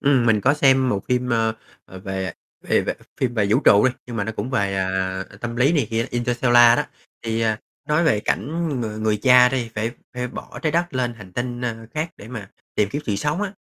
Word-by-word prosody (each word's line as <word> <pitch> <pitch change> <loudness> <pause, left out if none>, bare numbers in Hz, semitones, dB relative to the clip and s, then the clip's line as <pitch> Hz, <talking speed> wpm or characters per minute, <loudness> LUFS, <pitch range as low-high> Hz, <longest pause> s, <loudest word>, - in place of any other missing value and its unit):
Ừm, 135 -4 +3
mình 110 -2 +4
có 140 +7 +3
xem 135 -3 +4
một 100 -5 0
phim, 125 0 0
ơ, 115 -1 +2 0.3
ờ, 95 - -11
về 95 -2 -4 0.3
về - - +2
về - - -2 0.3
phim 125 -2 0
về 105 -3 +2
vũ - - +4
trụ 105 +4 +6
đi. 130 - +2
Nhưng 120 -1 -6
mà 100 - -1
nó 110 - -3
cũng 110 +3 -4
về, 100 -7 0
à, 95 0 -1
ờ, - - -14
tâm 115 +3 -5
lý 130 +6 +3
này 145 -8 +2
kia, 115 +1 0
"Interstellar" 120 0 +4
đó. - - +1 0.4
Thì, 115 0 -2
à, 110 -1 0 0.3
nói 150 +3 +2
về 110 -10 +3
cảnh 165 +9 -1
người 110 -2 -4
người 110 -1 +1
cha 125 +2 +6
đi 125 -3 -2
phải 110 +2 -1 0.2
phải 125 0 -3
bỏ - - -9
Trái 155 - 0
Đất 170 -2 0
lên 125 -2 -1
hành 105 -5 -13
tinh, 120 +3 -3
ơ, 115 -2 -4
khác 155 +2 -2
để 105 - -12
mà 110 -5 -8 0.2
tìm 105 - +2
kiếm 145 +8 -4
sự 105 - 0
sống 150 - -1
á. 205 -2 -3
120 Hz, 240 wpm, -22 LUFS, 105-130 Hz, 0.4 s, trụ